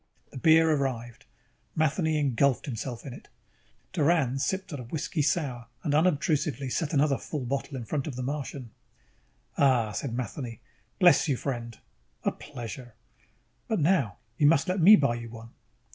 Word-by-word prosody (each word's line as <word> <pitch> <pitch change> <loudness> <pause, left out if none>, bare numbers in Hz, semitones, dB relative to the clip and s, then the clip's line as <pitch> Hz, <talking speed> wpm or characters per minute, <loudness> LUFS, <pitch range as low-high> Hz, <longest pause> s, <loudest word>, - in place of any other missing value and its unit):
_ - - -36
The - - -7
beer 160 +3 +5
arrived. 130 -3 -2 0.5
Matheny 155 +1 +1
engulfed 140 -2 +2
himself 120 -2 -5
in 135 - -6
it. - - -12 0.7
Doran 150 -6 +2
sipped 190 +4 -2
at 145 - -4
a 125 - -7
whiskey 150 +4 -2
sour 135 -6 -1 0.2
and 150 - 0
unobtrusively 150 -4 +1
set 160 +1 -1
another 145 -2 +2
full 145 -5 -5
bottle 135 +2 -3
in 120 - -6
front 140 +3 -2
of 140 - -5
the 125 - -4
Martian. 135 -3 -5 0.9
"Ahhh!" 125 -6 +3
said 120 0 -3
Matheny. 120 -1 -5 0.4
"Bless 175 -1 +5
you, 140 - +2
my - - -9
friend." 120 -4 -4 0.5
"A - - +1
pleasure." 120 -3 -9 0.7
"But 220 - 0
now 145 - +2 0.2
you 145 - +5
must 145 -2 +4
let 185 +1 0
me 200 +6 +10
buy 140 - +2
you 120 0 -6
one." 115 0 -10
140 Hz, 165 wpm, -28 LUFS, 120-155 Hz, 0.9 s, me